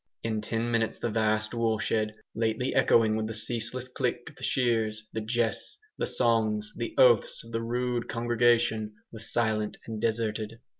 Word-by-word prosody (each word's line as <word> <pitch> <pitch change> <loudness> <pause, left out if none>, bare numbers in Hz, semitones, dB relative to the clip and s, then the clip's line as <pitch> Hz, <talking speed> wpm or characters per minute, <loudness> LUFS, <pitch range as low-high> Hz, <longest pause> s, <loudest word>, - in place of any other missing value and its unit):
In 110 -2 -1
ten 115 +2 -1
minutes 115 -1 0
the 120 - -2
vast 110 0 +1
woolshed, 110 -1 0 0.2
lately 115 +3 0
echoing 110 -2 +4
with 110 0 -1
the 110 - -3
ceaseless 120 +3 0
click 125 +2 -2
of - - -24
the - - -12
shears, 110 -4 +1
the 110 - -2
jests, 115 +1 -1 0.2
the - - -2
songs, 110 -3 +1
the 115 0 -4
oaths 120 -5 +5
of 115 - -13
the 115 0 -1
rude 120 +1 -2
congregation, 115 -2 +2 0.2
was 110 0 -6
silent 110 -2 0
and 110 -2 -5
deserted. 110 -1 -1
115 Hz, 160 wpm, -28 LUFS, 110-120 Hz, 0.2 s, oaths